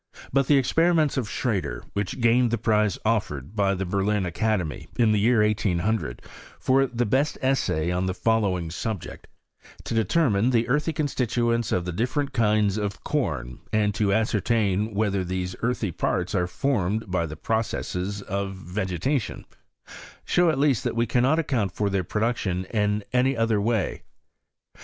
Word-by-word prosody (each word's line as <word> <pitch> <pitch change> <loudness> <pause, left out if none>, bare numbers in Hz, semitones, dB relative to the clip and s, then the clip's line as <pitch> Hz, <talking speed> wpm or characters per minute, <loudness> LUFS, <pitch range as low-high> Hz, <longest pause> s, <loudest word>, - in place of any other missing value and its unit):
But 135 -1 +3
the 145 - +5
ex 130 -2 0
periments 165 -3 +3
of 125 -7 -2
Schrader, 110 -8 -2
which 100 +5 -3
gained 120 +1 +4
the 120 - 0
prize 105 -2 +1
offered 100 - -1
by 100 -2 +2
the 95 +1 -3
Berlin 100 +2 0
Academy, 90 -2 -1
in 115 -3 +4
the 105 - +2
year 110 +1 +4
1800, 100 - -1 0.4
for 135 +1 +3
the 120 0 -1
best 135 +7 +1
essay 110 - 0
on 90 +1 0
the 95 - -2
following 100 -8 0
subject: 100 +2 -5 0.6
To - - -4
determine 115 - +2
the 120 -2 +2
earthy 150 +5 +1
constituents 120 -6 0
of 90 - 0
the 90 - -3
different 130 - -1
kinds 105 -4 +2
of 100 -2 -3
com, - - -2
and 105 -1 +2
to 100 0 +1
ascertain 105 -1 +1
whether 100 -2 +1
these 90 0 -3
earthy 115 -5 -1
parts 90 +3 -1
are 90 -3 +1
formed 110 -3 -1
by 85 -3 0
the 75 0 -8
processes 100 -1 -2
of 100 0 -3
vegetation, 95 - -2 0.8
show 175 -1 +3
at 155 - +1
least 140 -5 +2
that - - -2
we 115 0 +2
cannot 125 +6 +2
account 120 - 0
for 100 +2 -1
their 95 -1 0
production 100 -2 -1
in 105 -1 +1
any 130 +1 +2
other 115 -2 +2
way. 110 -2 0
105 Hz, 160 wpm, -25 LUFS, 95-120 Hz, 0.8 s, the